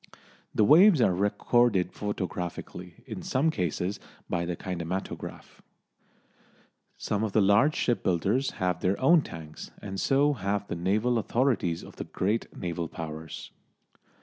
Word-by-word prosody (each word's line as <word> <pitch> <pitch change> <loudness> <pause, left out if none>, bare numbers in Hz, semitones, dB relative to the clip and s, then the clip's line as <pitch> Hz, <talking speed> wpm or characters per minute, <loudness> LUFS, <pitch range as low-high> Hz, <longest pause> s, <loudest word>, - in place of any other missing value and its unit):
The 110 - +4
waves 170 - +7
are 110 -6 +4
recorded 105 +1 +2
photographically, 90 -3 -5
in - - -6
some 145 +5 +1
cases 90 - -2 0.3
by 85 -1 -1
the 90 0 -2
kinematograph. 90 +1 -6 1.4
Some 105 0 -2
of 110 -3 -2
the - - +4
large 105 +10 +4
shipbuilders 115 +3 +1
have 90 -2 -1
their 95 +2 0
own 165 +5 +5
tanks, 80 - -9
and 95 -2 -6
so 145 +2 +3
have 100 -3 -2
the - - -3
naval 105 +8 +1
authorities 115 -8 0
of - - -13
the - - -5
great 105 +5 -1
naval 85 -2 -3
Powers. 80 0 -7
100 Hz, 130 wpm, -28 LUFS, 90-120 Hz, 1.4 s, waves